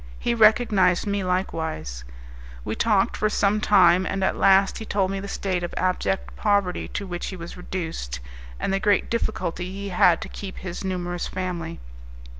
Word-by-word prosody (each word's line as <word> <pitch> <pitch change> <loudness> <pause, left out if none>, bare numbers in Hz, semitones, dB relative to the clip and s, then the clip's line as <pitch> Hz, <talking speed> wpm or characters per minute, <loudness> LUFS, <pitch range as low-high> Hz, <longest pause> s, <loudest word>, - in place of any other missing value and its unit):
He 235 - 0
recognized 210 -5 +4
me 200 -1 -1
likewise. 160 - -2 0.6
We - - -2
talked 205 - +2
for 215 - +1
some 210 0 +1
time, 185 -4 +5
and 195 0 -2
at - - +1
last 195 0 +4
he - - -5
told 195 -3 0
me 195 - -2
the 200 - -6
state 190 -2 -2
of 175 - -5
abject 95 - -1
poverty 200 - +1
to 205 - -5
which 175 -2 -5
he 190 - -5
was 170 -1 -8
reduced, 165 - -5 0.4
and - - -1
the 195 - +1
great 205 -1 +2
difficulty 185 -6 -2
he 200 +1 -5
had 175 -2 +4
to - - -5
keep 195 -2 -8
his 185 0 -6
numerous 175 -2 -3
family. 175 -3 -4
185 Hz, 175 wpm, -24 LUFS, 175-200 Hz, 0.6 s, time